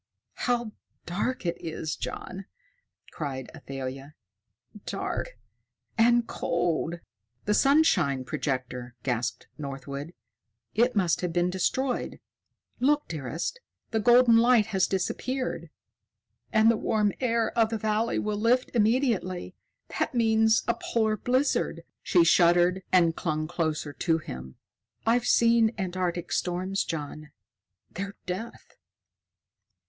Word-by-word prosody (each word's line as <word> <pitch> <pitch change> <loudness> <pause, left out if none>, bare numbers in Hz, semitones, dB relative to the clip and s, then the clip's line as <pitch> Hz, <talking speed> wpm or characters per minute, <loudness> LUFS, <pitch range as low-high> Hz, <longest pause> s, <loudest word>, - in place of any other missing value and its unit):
"How 240 -2 +1 0.3
dark 205 +7 -2
it 170 - -1
is, 160 -1 -3
John!" 190 +1 -6 0.7
cried 135 -4 -5
Athalia. 135 0 -7 0.7
"Dark - - -3 0.6
and 235 +1 +4
cold!" 170 -2 -1 0.4
"The 210 - +2
sunshine 205 - +3
projector!" 130 -4 -3
gasped 125 -1 -2
Northwood. 140 +3 -6 0.6
"It 240 +2 +2
must 180 -5 +2
have 180 -2 -1
been 175 +1 +1
destroyed. 245 +8 -1 0.6
Look, 295 +3 +2
dearest! 160 - -4 0.3
The 220 - +1
golden 240 +1 +6
light 235 -2 +5
has 190 -1 +3
disappeared." 255 +7 -2 0.8
"And 220 +1 +5
the 230 - 0
warm 210 -2 +1
air 230 -3 0
of 225 -1 +3
the 225 - -2
valley 220 +1 0
will 210 -1 -1
lift 245 +3 +2
immediately. 220 -6 +1 0.5
That - - -1
means 220 -1 +3
a 235 - +3
polar 220 -2 0
blizzard." 255 +6 0 0.2
She 175 - +4
shuddered 175 +2 +4
and 170 -3 +4
clung 155 -2 -2
closer 155 -3 -2
to 165 +1 +1
him. 65 - -8 0.5
"I've 240 +2 +2
seen 230 -1 +4
Antarctic 180 -2 -2
storms, 185 +2 -1
John. 155 -1 -6 0.6
They're 200 +2 -5
death." 190 +6 -7
190 Hz, 110 wpm, -27 LUFS, 160-230 Hz, 0.8 s, golden